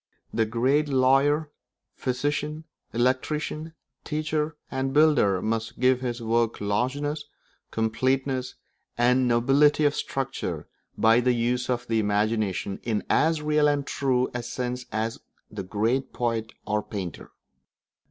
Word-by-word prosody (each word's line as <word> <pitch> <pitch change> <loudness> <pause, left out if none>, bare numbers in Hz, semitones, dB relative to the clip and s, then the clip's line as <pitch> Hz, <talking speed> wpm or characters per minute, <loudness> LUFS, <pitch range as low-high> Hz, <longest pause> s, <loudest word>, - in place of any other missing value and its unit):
The 115 0 +2
great 130 +7 +2
lawyer, 140 +3 +3 0.4
physician, 145 +4 -2 0.3
electrician, 150 +6 -1 0.3
teacher, 155 0 -2
and 135 +1 -2
builder 145 -12 +4
must 115 +1 -2
give 130 0 +3
his 120 -2 -3
work 115 0 +1
largeness, 135 +9 -1 0.5
completeness, 130 +3 0 0.4
and 125 +2 +3
nobility 135 +6 +4
of 145 - +3
structure 130 - -3 0.3
by 115 +1 +5
the 125 0 +2
use 120 +1 0
of 125 -1 -1
the 115 -2 +1
imagination 105 -2 0
in 110 -3 -1
as 160 -1 +2
real 150 0 +3
and 145 -1 +1
true 130 -3 0
a 125 - -2
sense 125 +1 -4
as 110 +1 -2 0.3
the - - -5
great 115 +8 -1
poet 115 -2 -1
or 105 0 0
painter. 95 -6 -6
125 Hz, 125 wpm, -26 LUFS, 115-145 Hz, 0.5 s, by